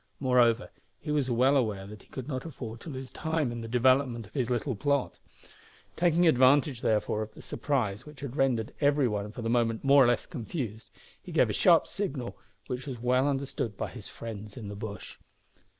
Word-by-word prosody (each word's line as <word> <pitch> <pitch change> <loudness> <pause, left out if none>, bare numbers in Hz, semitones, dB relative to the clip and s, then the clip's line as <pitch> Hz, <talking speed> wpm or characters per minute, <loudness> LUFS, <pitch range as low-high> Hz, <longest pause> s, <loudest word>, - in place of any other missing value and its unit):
Moreover, 125 -2 +3 0.3
he 150 - -5
was 145 -3 +1
well 125 +4 +4
aware 105 -7 0
that 105 0 -10
he - - -22
could 130 -1 -7
not 130 -3 -3
afford 120 -8 -7
to 160 - -9
lose 130 -2 -7
time 160 -5 -1
in 120 -1 -5
the 115 - -6
development 125 0 +2
of 100 - -19
his 130 -4 -1
little 125 +2 0
plot. 140 +4 0 0.8
Taking 175 0 +3
advantage, 130 -2 +4
therefore, 110 0 +1
of 110 0 -6
the - - -11
surprise 120 -9 -1
which 150 -2 -13
had 140 -2 -6
rendered 130 -3 +1
every 145 -2 +4
one 105 -1 -3
for 115 - -7
the - - -2
moment 115 -2 +1
more 140 0 +7
or - - +4
less 120 -1 +1
confused, 115 - -5 0.3
he - - -10
gave - - +3
a - - -3
sharp - - +5
signal - - -4 0.3
which 125 +3 -5
was 130 -3 -4
well 125 +3 +2
understood 135 -6 -2
by - - -3
his 115 -4 -9
friends 105 -2 -8
in 105 -5 -6
the 100 - -6
bush. 100 -1 -7
125 Hz, 200 wpm, -29 LUFS, 115-140 Hz, 0.8 s, more